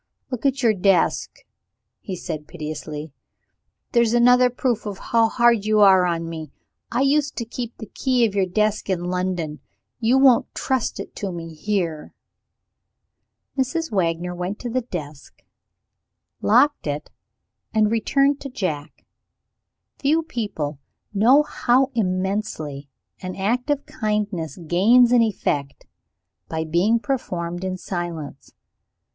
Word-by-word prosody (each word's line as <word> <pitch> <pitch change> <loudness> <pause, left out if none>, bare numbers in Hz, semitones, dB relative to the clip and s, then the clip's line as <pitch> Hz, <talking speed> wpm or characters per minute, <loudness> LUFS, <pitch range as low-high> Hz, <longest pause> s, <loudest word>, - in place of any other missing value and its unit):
"Look 250 +2 0
at 270 0 -1
your 225 -2 +5
desk," 195 -3 +1 0.6
he 190 - -6
said 155 -4 -6
piteously; 155 -2 -6 0.8
"there's 235 -2 +3
another 250 +1 +6
proof 245 -2 -1
how 225 +2 +1
hard 235 -3 +3
you 215 0 +2
are 190 -3 +6
on 165 -1 -2
me. 160 -3 -7 0.4
I 240 - +1
used 280 +1 +2
to 235 - -3
keep 235 0 -6
the 220 - -7
key 250 +1 +1
of 210 - -1
your 195 -2 +1
desk 210 +3 0
in 180 -2 0
London. 180 -4 -2 0.4
You 240 +2 +3
won't 265 -3 +4
trust 260 -3 -1
it - - -8
to 200 -2 -3
me 165 -1 -7
here." 170 -2 -3 1.4
Mrs. 300 +4 -1
Wagner 175 -2 0
went 180 +3 -4
to 240 - -4
the 255 +2 0
desk, 155 - -8 1.0
locked 290 - +3
it, 145 +1 -4 0.6
and 215 -1 +2
returned 275 +5 +2
to 275 - -6
Jack. 160 - -4 0.9
Few 310 +4 +2
people 200 - -4 0.3
know 245 +9 +5
how 265 -2 +2
immensely 185 -8 -2 0.3
an 185 0 -5
act 240 +8 -1
of 290 -1 0
kindness 210 - -2
gains 230 +9 +5
in 245 -1 +6
effect, 145 -10 -1 0.6
by 160 0 -2
being 175 +8 +2
performed 175 - -3
in 185 0 -2
silence. 170 -6 -5
Mrs. - - -30
205 Hz, 130 wpm, -22 LUFS, 170-245 Hz, 1.4 s, another